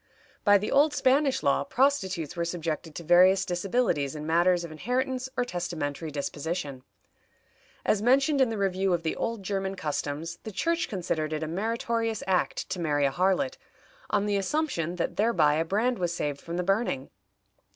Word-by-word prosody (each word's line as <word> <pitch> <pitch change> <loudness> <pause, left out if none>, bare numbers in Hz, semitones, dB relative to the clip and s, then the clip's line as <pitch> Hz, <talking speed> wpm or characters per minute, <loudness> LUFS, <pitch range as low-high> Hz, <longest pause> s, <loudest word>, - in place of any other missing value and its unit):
By 205 -1 +6
the 205 +2 -3
old 295 +1 +4
Spanish 270 +1 +2
law - - +2
prostitutes 200 - 0
were 170 - -1
subjected 165 -2 -4
to 170 - -6
various 180 +3 +5
disabilities 175 - 0
in 150 0 -6
matters 175 +2 +3
of 170 - -7
inheritance 255 - -2
or 245 - +1
testamentary 165 - -4
disposition. 145 -1 -4 1.0
As 205 - +2
mentioned 275 +4 +3
in 260 - +4
the 225 - -3
review 190 -1 +1
of 170 - -5
the 160 - -1
old 230 -3 -3
German 195 0 -2
customs, 155 0 -3
the 220 - -7
Church 335 - 0
considered 165 -6 -2
it 155 0 -2
a - - -3
meritorious 225 +4 -1
act 185 -2 0
to 185 - -2
marry 145 -3 +1
a 135 - +2
harlot, 190 - +1 0.5
on 205 -1 +1
the 205 -1 +1
assumption 195 - -1
that 175 - -3
thereby 180 -9 +3
a 160 - +2
brand 220 +6 0
was 175 -2 0
saved 145 -4 -3
from 170 +1 -5
the 180 - 0
burning. 195 - 0
185 Hz, 170 wpm, -27 LUFS, 165-230 Hz, 1.0 s, By